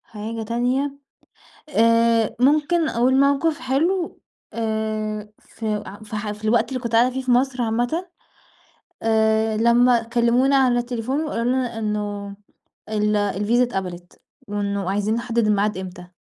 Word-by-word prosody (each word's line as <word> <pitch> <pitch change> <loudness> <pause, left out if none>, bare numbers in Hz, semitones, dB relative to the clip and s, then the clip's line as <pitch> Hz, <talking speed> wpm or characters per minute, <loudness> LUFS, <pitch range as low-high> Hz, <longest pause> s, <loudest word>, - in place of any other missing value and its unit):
حاجة 225 +1 -6
تانية 245 +5 0 0.8
آآ، 230 -2 +3
ممكن 310 +5 +3
أقول 255 +3 +2
موقف 280 +3 +2
حلو 330 +8 -1 0.3
آآ، 215 -1 -3
ف 225 - -12 0.4
ف 215 0 -5
في 215 - -13
الوقت 225 +2 +2
اللي 260 -2 -4
كنت 235 -2 -5
قاعدة 235 +2 +4
فيه 265 +1 -4
في 255 - -2
مصر 250 +1 +2
عامةً 240 +10 -1 1.0
آآ، 220 0 +2
لما 235 +1 +4
كلمونا 240 +4 +2
على 255 -3 +3
التليفون، 245 +4 -2
وقالوا 230 -6 -2
لنا 250 -2 0
إنه 205 -2 -3 0.5
ال 210 -1 +1
الفيزا 205 +4 +1
اتقبلت، 180 -6 -5 0.3
وإنه 200 -2 -2
عايزين 205 +2 0
نحدد 235 -1 0
الميعاد 210 0 +1
إمتى. 180 -1 -8
230 Hz, 130 wpm, -22 LUFS, 215-255 Hz, 1.0 s, قاعدة